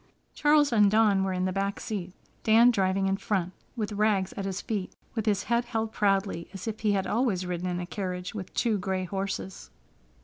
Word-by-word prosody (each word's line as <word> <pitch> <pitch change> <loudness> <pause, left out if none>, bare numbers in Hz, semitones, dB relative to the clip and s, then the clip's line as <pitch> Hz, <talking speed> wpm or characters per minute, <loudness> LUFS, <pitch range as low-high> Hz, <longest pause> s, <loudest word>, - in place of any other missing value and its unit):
Charles 295 -2 +4
and 210 -3 +5
Dawn 210 -2 +4
were 190 - 0
in 185 0 -1
the 185 - 0
back 200 +1 -1
seat, 190 -5 -4 0.3
Dan 230 +2 +6
driving 195 -2 +1
in 195 0 +1
front, 190 -3 -1 0.2
with 215 -3 -3
Rags 205 -2 +1
at 195 - -4
his 190 -1 -3
feet, 205 -4 -4 0.2
with 220 -2 -3
his 205 -2 +2
head 235 +1 +1
held 225 -2 -2
proudly, 195 -4 0
as 195 - -7
if 220 -1 -3
he 210 -2 +2
had 195 -1 0
always 215 -6 0
ridden 180 0 -3
in 175 0 -2
a 175 - -3
carriage 180 -1 -4
with 195 -4 -6
two 225 -4 +1
gray 185 0 -1
horses. 190 0 -4
195 Hz, 205 wpm, -28 LUFS, 185-220 Hz, 0.3 s, Dan